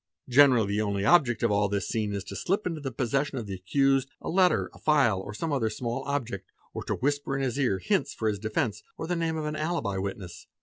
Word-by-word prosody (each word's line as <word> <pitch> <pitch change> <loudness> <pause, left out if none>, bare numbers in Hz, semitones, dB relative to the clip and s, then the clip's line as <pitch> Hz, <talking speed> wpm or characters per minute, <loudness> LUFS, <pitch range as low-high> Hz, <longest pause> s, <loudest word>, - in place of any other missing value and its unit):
Generally 125 -5 +5
the 105 +1 0
only 100 -1 -1
object 125 -5 +4
of 115 - +3
all 100 0 +2
this 100 -2 -1
scene 110 -2 -1
is 100 -1 -3
to - - -8
slip 195 +4 -1
into 165 -4 -3
the 135 -2 -4
possession 135 +4 -1
of 115 - -4
the 100 - -5
accused, 135 +8 +1
a - - -6
letter, 180 0 +3
a - - -15
file, 135 -11 +3
or 100 +2 -7
some 155 +8 -3
other 115 -5 +1
small 120 +4 -3
object, 120 -9 -3 0.2
or - - -5
to - - -1
whisper 145 0 -1
in 135 - -1
his 130 +1 -1
ear 125 -8 +2
hints 90 - 0
for 110 - -3
his 105 -2 0
defence 110 0 -1 0.2
or - - -4
the 175 +2 -1
name 165 -1 -1
of 155 - -3
an 150 0 -3
alibi 155 - -1
witness. 95 -2 -6
120 Hz, 245 wpm, -28 LUFS, 105-145 Hz, 0.2 s, Generally